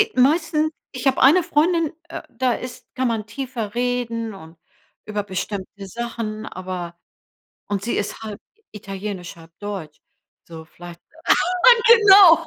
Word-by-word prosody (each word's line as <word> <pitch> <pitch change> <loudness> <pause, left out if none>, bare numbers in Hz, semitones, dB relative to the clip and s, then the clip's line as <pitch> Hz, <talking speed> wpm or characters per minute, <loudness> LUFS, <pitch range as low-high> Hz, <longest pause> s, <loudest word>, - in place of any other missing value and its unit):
meisten 310 +3 +2 0.2
ich 255 +1 -2
hab 265 - +3
eine 305 +8 +6
Freundin, 320 +1 +1 0.2
äh, - - -6
da 250 +1 0
ist 250 +2 -7
kann 260 0 0
man 225 -3 -2
tiefer 230 -2 -5
reden 240 -2 -2
und 165 -3 -13 0.5
über 210 -1 -3
bestimmte 195 0 -5
Sachen, 220 0 -5
aber 180 -3 -6 0.7
und 200 -2 -2
sie 235 +4 -2
ist 205 +2 -3
halb 215 -1 -7 0.3
italienisch, 195 -3 -7
halb 165 0 -15
deutsch. 195 -7 -6 0.5
So 160 -1 -10
vielleicht. 175 +1 -12 0.9
Genau. 390 -7 +8
220 Hz, 130 wpm, -22 LUFS, 195-260 Hz, 0.9 s, Genau